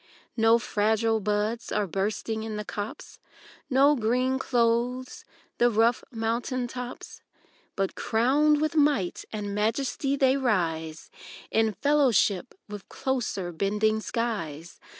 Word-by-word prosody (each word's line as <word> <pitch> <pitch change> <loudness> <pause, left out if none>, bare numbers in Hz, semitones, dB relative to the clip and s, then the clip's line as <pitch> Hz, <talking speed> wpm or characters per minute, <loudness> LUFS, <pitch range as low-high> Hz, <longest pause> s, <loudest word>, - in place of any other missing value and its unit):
No 225 0 +5
fragile 220 0 +1
buds 210 +3 -1
are 210 -1 +1
bursting 210 +4 -2
in 220 -1 -5
the 210 0 -4
copse, 205 +1 -7 0.5
No 280 +2 +5
green 255 +2 +1
clothes 245 +1 0 0.3
the 240 - +5
rough 230 +2 +2
mountain 240 +2 -2
tops; 250 0 -8 0.5
But 195 -1 -1
crowned 280 +6 +2
with 310 0 0
might 285 - +1
and 205 -2 -4
majesty 260 +6 0
they 270 -1 +3
rise 165 - -1 0.4
In 220 -1 +2
fellowship 245 -7 +2
with 205 -1 -9
closer 235 -9 -2
bending 210 +5 0
skies. 175 -10 -4
225 Hz, 115 wpm, -27 LUFS, 210-255 Hz, 0.5 s, No